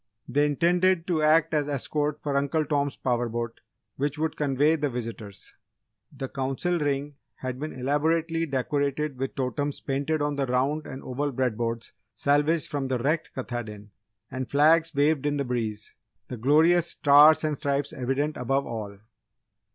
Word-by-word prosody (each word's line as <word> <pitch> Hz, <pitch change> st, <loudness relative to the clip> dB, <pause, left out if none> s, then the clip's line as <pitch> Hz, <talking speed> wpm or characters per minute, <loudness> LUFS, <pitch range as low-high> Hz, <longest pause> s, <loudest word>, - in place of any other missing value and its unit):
They 145 Hz, +3 st, +2 dB
intended 175 Hz, +3 st, +2 dB
to 170 Hz, -4 st, 0 dB
act 155 Hz, +1 st, +4 dB
as 150 Hz, -1 st, +1 dB
escort 145 Hz, +2 st, -1 dB
for 145 Hz, -2 st, -1 dB
Uncle 140 Hz, +3 st, +1 dB
Tom's 145 Hz, -1 st, -1 dB
power 120 Hz, -2 st, 0 dB
boat 115 Hz, 0 st, -4 dB, 0.4 s
which 145 Hz, +2 st, -1 dB
would 160 Hz, +1 st, -1 dB
convey 145 Hz, +2 st, +2 dB
the 145 Hz, -2 st, -1 dB
visitors. 115 Hz, -5 st, -7 dB, 0.6 s
The 135 Hz, -2 st, -5 dB
Council 135 Hz, +7 st, -1 dB
Ring 145 Hz, -1 st, -2 dB, 0.2 s
had 130 Hz, -1 st, -5 dB
been 155 Hz, +2 st, -4 dB
elaborately 160 Hz, +5 st, 0 dB
decorated 140 Hz, +1 st, -1 dB
with 135 Hz, 0 st, -3 dB
totems 135 Hz, +2 st, -2 dB
painted 140 Hz, +3 st, -1 dB
on 145 Hz, -1 st, -1 dB
the 135 Hz, -1 st, 0 dB
round 135 Hz, +5 st, 0 dB
and 130 Hz, -, -8 dB
oval 140 Hz, +3 st, -2 dB
bread 130 Hz, -3 st, 0 dB
boards 115 Hz, 0 st, -3 dB, 0.2 s
salvaged 145 Hz, +3 st, +2 dB
from 140 Hz, -2 st, -3 dB
the 130 Hz, -1 st, 0 dB
wrecked 150 Hz, +7 st, -1 dB
Katahdin, 110 Hz, -5 st, -6 dB, 0.4 s
and 130 Hz, 0 st, -4 dB
flags 160 Hz, +3 st, +4 dB
waved 145 Hz, 0 st, +2 dB
in 145 Hz, 0 st, 0 dB
the 140 Hz, -, -1 dB
breeze 115 Hz, -4 st, -3 dB, 0.4 s
the 125 Hz, -, -5 dB
glorious 160 Hz, +8 st, +4 dB
Stars 150 Hz, +2 st, +6 dB
and 155 Hz, -1 st, 0 dB
Stripes 140 Hz, 0 st, -1 dB
evident 135 Hz, +3 st, -1 dB
above 135 Hz, +3 st, 0 dB
all. 105 Hz, -3 st, -6 dB
140 Hz, 160 wpm, -26 LUFS, 130-150 Hz, 0.6 s, Stars